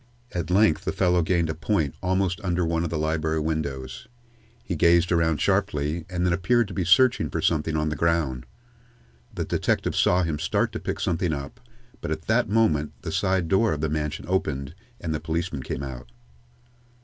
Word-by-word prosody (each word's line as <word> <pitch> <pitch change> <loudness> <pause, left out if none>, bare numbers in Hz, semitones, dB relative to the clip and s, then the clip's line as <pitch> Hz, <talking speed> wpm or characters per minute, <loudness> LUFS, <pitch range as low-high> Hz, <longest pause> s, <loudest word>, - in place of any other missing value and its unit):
At 85 -1 -3
length 95 -2 +3
the - - -1
fellow 90 -1 +2
gained 85 0 +1
a 80 - -2
point 80 -3 -1
almost 95 -1 0
under 90 -1 0
one 80 0 0
of 85 - -2
the 80 - -2
library 80 0 0
windows. 70 - -3 0.6
He 90 - -3
gazed 85 +2 +4
around 80 -3 +2
sharply, 75 +3 0
and 90 -1 -1
then 90 - +2
appeared 115 +6 +2
to - - -7
be 95 - -1
searching 110 +9 +4
for - - -3
something 80 -1 +1
on 75 0 0
the 75 - -3
ground. 75 -6 0 0.8
The - - -3
detective - - 0
saw 90 +1 +3
him 80 -3 -2
start 80 - 0
to - - -5
pick - - -4
something 85 -1 0
up, 70 - -6 0.4
but - - -4
at 80 +1 -3
that 115 -1 +1
moment 80 -10 +2
the - - -4
side 95 -2 +1
door 100 +4 +3
of 75 - -4
the 80 - 0
mansion 75 0 -3
opened 75 -6 -1 0.3
and 80 -3 -3
the 80 - -2
policeman 80 -1 -3
came 65 +1 -4
out. 60 -3 -8
80 Hz, 190 wpm, -25 LUFS, 75-90 Hz, 0.8 s, gazed